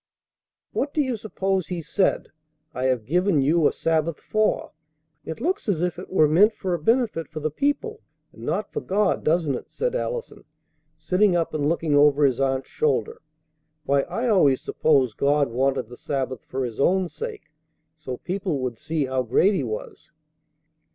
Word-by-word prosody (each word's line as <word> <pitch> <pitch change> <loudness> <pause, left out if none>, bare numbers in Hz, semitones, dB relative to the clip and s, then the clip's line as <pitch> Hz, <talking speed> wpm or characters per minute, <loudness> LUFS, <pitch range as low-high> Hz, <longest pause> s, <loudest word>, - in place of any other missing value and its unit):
"What 285 - -2
do 305 - +3
you 260 -3 -1
suppose 195 -4 -2
He 175 -2 -4
said, 185 +5 0 0.4
'I 130 - -2
have 125 -4 +1
given 180 - +2
you 150 +3 +3
a - - +1
sabbath' 165 -1 0
for? 215 0 0 0.5
It 160 - -6
looks 360 - -1
as 185 -6 +1
if 175 0 -1
it 180 - -9
were 155 -5 +5
meant 200 +9 +4
for 185 -2 -2
a 175 - -1
benefit 225 - +1
for 155 - -7
the 155 0 -2
people 290 - -1 0.3
and - - -15
not - - -3
for 445 - -2
God, 205 +1 0
doesn't 160 -3 +1
it?" 125 - -6
said - - -2
Allison, - - -4 0.5
sitting 190 0 +2
up 165 -2 0
and 145 -1 0
looking 165 -2 0
over 145 0 +5
his 130 -2 +1
aunt's 135 -1 -1
shoulder. 460 0 0 0.6
"Why, 140 -1 +2
I 245 +2 -2
always 150 - +4
supposed 130 -7 +1
God 140 -2 +2
wanted 130 0 0
the 125 +1 -12
Sabbath 130 -4 -3
for 130 0 -3
His 115 -3 -7
own 185 +5 +3
sake, 445 - -8 0.4
so 130 -5 -6
people 185 -4 -3
would 125 -3 -4
see 155 -2 -1
how 130 0 -1
great 130 - +3
He 180 - 0
was." 110 -3 -6
165 Hz, 180 wpm, -24 LUFS, 135-205 Hz, 0.6 s, were